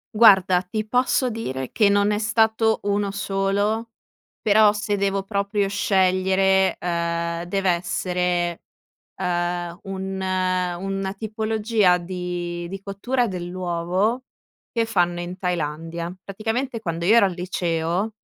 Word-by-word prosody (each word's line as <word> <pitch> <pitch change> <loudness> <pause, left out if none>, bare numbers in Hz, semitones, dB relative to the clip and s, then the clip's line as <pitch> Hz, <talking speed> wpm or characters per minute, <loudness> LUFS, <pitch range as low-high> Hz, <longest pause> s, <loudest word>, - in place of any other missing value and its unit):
Guarda, 190 -5 +6
ti 215 +4 -4
posso 250 +1 +2
dire 130 - -4
che 210 -2 +3
non 205 +1 +3
è 210 - 0
stato 220 0 +2
1 205 0 0
solo, 200 +3 -1 0.5
però 210 0 +6
se 205 0 -2
devo 195 -1 0
proprio 200 0 -1
scegliere, 190 -1 +2
uhm, 170 0 -2
deve 190 +1 0
essere, 175 0 -1 0.6
uhm, 175 -1 -2
un 190 0 -5 0.6
una 195 0 -3
tipologia 215 -3 +1
di 175 -1 -4
di 195 0 -6
cottura 240 +6 -1
dell'uovo 180 +5 -1 0.5
che 230 -1 +1
fanno 175 -5 +1
in 175 +1 -5
Thailandia. 170 -1 -3
Praticamente 225 +5 -3
quando 170 -5 -3
io 215 +6 +5
ero 230 - +6
al 190 - -2
liceo 175 +2 -1
190 Hz, 120 wpm, -23 LUFS, 175-210 Hz, 0.6 s, Guarda